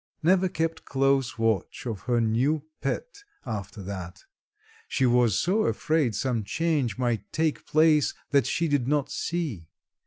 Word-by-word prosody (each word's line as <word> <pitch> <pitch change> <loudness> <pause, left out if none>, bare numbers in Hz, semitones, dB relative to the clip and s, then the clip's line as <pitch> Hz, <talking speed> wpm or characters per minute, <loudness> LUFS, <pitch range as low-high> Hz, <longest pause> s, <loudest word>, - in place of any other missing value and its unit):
Neva 185 +2 +4
kept 165 -1 -2
close 135 -2 +1
watch 115 -2 -1
of 110 -5 -3
her 120 -1 +3
new 125 +7 +1 0.2
pet 410 -5 -4 0.2
after 105 -3 -5
that, 90 -2 -7 0.6
she 130 - +1
was 120 -4 +3
so 210 +5 +2
afraid 155 -9 +1
some 120 0 -1
change 145 -3 0
might 120 -3 -1
take 155 -1 -1
place 155 -2 +4 0.2
that 140 -2 +3
she 170 - 0
did 145 -5 +1
not 145 0 0
see. 150 - -3
135 Hz, 145 wpm, -26 LUFS, 115-160 Hz, 0.6 s, Neva